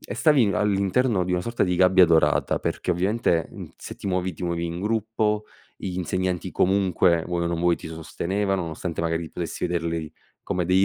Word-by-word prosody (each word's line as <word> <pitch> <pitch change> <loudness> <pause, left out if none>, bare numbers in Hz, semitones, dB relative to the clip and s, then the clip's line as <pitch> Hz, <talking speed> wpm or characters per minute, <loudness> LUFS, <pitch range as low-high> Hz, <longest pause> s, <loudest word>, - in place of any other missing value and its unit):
e 100 - -7
stavi 130 -6 +4
all'interno 100 +1 +1
di 90 - -2
una 90 - +1
sorta 115 +4 0
di 90 -1 0
gabbia 90 0 +6
dorata 80 -3 +3
perché, 90 - -1
ovviamente, 90 -2 +1
mhmm, - - -9
se - - -9
ti - - -8
muovi, 90 -1 -1
ti 90 - -6
muovi 85 0 -1
in 85 +2 -5
gruppo, 110 0 0 0.3
gli 90 -2 -5
insegnanti 90 0 -2
comunque, 90 -3 +2
vuoi 85 -1 -1
o - - 0
non 85 -1 -2
vuoi, 85 -1 +3
ti - - -9
sostenevano, 95 +4 -2
nonostante 85 +1 -4
magari 85 -1 -1
potessi 85 0 -3
vederli 85 -2 -2 0.3
come 90 -1 -1
dei 95 +1 +4
90 Hz, 190 wpm, -24 LUFS, 85-100 Hz, 0.3 s, gabbia